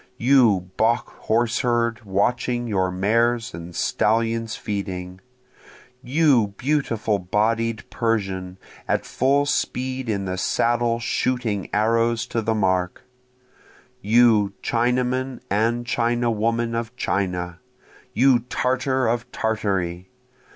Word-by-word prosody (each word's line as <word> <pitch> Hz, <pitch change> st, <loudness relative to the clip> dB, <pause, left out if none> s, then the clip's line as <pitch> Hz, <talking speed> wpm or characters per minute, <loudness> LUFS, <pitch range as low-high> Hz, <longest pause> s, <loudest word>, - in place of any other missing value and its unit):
You 115 Hz, -8 st, +3 dB
Bokh 115 Hz, +2 st, +2 dB, 0.2 s
horse 120 Hz, +2 st, +2 dB
herd 120 Hz, -2 st, 0 dB
watching 120 Hz, +5 st, 0 dB
your 95 Hz, -5 st, 0 dB
mares 115 Hz, +6 st, +1 dB
and 85 Hz, +1 st, -8 dB
stallions 115 Hz, 0 st, 0 dB
feeding! 95 Hz, -3 st, -5 dB, 0.8 s
You 130 Hz, -7 st, +2 dB
beautiful 115 Hz, -7 st, 0 dB
bodied 110 Hz, +4 st, 0 dB
Persian 95 Hz, -5 st, -2 dB, 0.3 s
at -, -, 0 dB
full 140 Hz, +2 st, +1 dB
speed 130 Hz, -2 st, -2 dB
in 100 Hz, -2 st, -1 dB
the 95 Hz, 0 st, -3 dB
saddle 120 Hz, +2 st, +1 dB
shooting 120 Hz, -5 st, -1 dB
arrows 115 Hz, +2 st, +1 dB
to 115 Hz, -, +1 dB
the 110 Hz, +1 st, 0 dB
mark! 95 Hz, -2 st, 0 dB, 1.0 s
You 110 Hz, -2 st, +4 dB
Chinaman 125 Hz, +2 st, 0 dB
and 115 Hz, +4 st, +1 dB
Chinawoman 115 Hz, -1 st, 0 dB
of 115 Hz, +1 st, -4 dB
China! 90 Hz, -6 st, -2 dB, 0.5 s
you 125 Hz, +1 st, +4 dB
Tartar 130 Hz, 0 st, 0 dB
of 120 Hz, +2 st, -1 dB
Tartary! 95 Hz, -5 st, -2 dB
115 Hz, 100 wpm, -23 LUFS, 100-120 Hz, 1.0 s, You